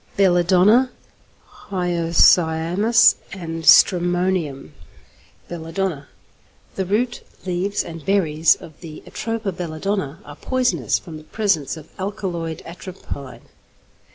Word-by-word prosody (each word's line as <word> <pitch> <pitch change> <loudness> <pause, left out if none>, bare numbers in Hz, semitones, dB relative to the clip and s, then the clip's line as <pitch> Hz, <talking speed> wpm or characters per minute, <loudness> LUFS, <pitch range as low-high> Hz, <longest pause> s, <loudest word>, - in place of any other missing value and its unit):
XXX. - - -27
BELLADONNA, 190 +6 +4 0.8
HYOSCYAMUS, 175 +3 +3 0.2
AND 165 -3 -6
STRAMONIUM 175 -5 +3 0.7
=Belladonna.= 165 -2 -4 0.7
The 190 - -3
root, 235 +5 -1 0.2
leaves, 185 +2 -1
and 165 -2 -9
berries, 165 -5 +3
of 155 -2 -14
the 160 -3 -10
Atropa 225 -3 -4
belladonna 170 -1 -3
are - - -11
poisonous 245 - 0
from 160 -3 -10
the 155 - -12
presence 170 -6 -1
of 155 -1 -12
alkaloid 180 -5 -4
atropine. 140 -8 -9
175 Hz, 100 wpm, -21 LUFS, 160-195 Hz, 0.8 s, BELLADONNA